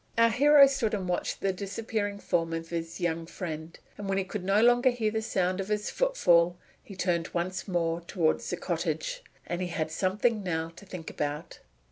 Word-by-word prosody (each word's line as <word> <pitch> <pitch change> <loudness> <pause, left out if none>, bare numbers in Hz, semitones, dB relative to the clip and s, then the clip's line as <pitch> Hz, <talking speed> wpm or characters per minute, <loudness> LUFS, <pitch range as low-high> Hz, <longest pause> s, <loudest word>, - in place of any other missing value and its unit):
Our 230 0 +5
hero 285 +4 +7
stood 255 -6 0
and 190 -3 -3
watched 180 - -2
the 195 -1 +1
disappearing 205 +1 -3
form 165 -4 0
of 165 0 -4
his 165 -1 -4
young 165 -2 -1
friend, 160 -2 -6 0.2
and 200 -1 -4
when 195 - +1
he 195 - +1
could 190 +1 -5
no 195 +2 +3
longer 245 +2 +5
hear 230 -3 0
the 220 0 -1
sound 185 -4 0
of 195 - -3
his 210 0 -1
footfall 175 - +3 0.3
he 195 - -11
turned 175 -2 0
once 180 +3 -2
more 170 -2 0
toward 170 -2 +1
the - - -4
cottage. - - -2 0.2
And 175 +1 -3
he 180 - -1
had 160 -2 -2
something 210 +6 +1
now 165 -3 -2
to 200 - -13
think 180 -4 -7
about. 150 +2 -4
185 Hz, 195 wpm, -29 LUFS, 170-215 Hz, 0.3 s, hero